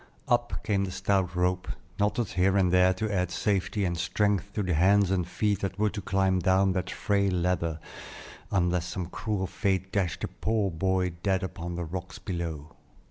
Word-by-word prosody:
Up 120 0 0
came 100 -2 +1
the - - -5
stout 95 -1 0
rope, 90 +1 0 0.3
knotted 105 +2 +1
here 95 +2 +2
and 90 -2 +3
there 90 0 +5
to 105 +2 -2
add 90 -2 +1
safety 100 +2 0
and 85 -1 0
strength 100 +3 0
to 105 - -1
the 90 -2 0
hands 95 +4 +4
and 90 -3 0
feet 105 +1 0
that 95 -1 -3
were 105 0 +2
to 105 - -5
climb 95 -1 +1
down 95 +2 +3
that 95 0 -2
frail 100 0 +1
ladder, 85 -2 0 0.7
unless 90 -2 +1
some 90 0 -3
cruel 100 +2 -2
fate 95 0 -1
dashed 95 -4 -1
the - - -1
poor 110 -3 -1
boy 95 +2 0
dead 95 0 +1
upon 90 -2 -5
the 85 0 -3
rocks 90 +3 -6
below. 80 -5 -5
95 Hz, 185 wpm, -28 LUFS, 90-100 Hz, 0.7 s, there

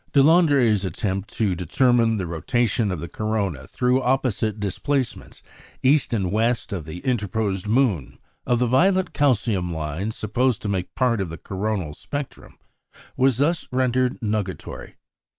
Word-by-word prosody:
Deslandres' 140 - +4
attempt 95 +2 -3
to 105 -5 +1
determine 115 - +2
the 95 - -2
rotation 110 +5 0
of 90 - -3
the 85 - -5
corona 100 -8 -2
through 125 +1 +1
opposite 120 -5 0
displacements, 125 +6 -3 0.4
east 135 +2 +3
and 95 -6 0
west 115 +1 0
of 85 -6 -4
the 80 +3 -7
interposed 105 -4 -1
moon, 110 - +1 0.3
of 120 - +1
the 125 - +2
violet 185 +9 +2
calcium 110 - +1
lines 80 +7 -3
supposed 120 +3 0
to - - -2
make 95 -3 -3
part 120 -5 +1
of 95 - -3
the 80 - -7
coronal 95 -5 -3
spectrum, 145 - -7 0.6
was 130 -2 +3
thus 160 +5 +1
rendered 130 0 +1
nugatory. 105 -6 -4
110 Hz, 140 wpm, -23 LUFS, 95-130 Hz, 0.6 s, Deslandres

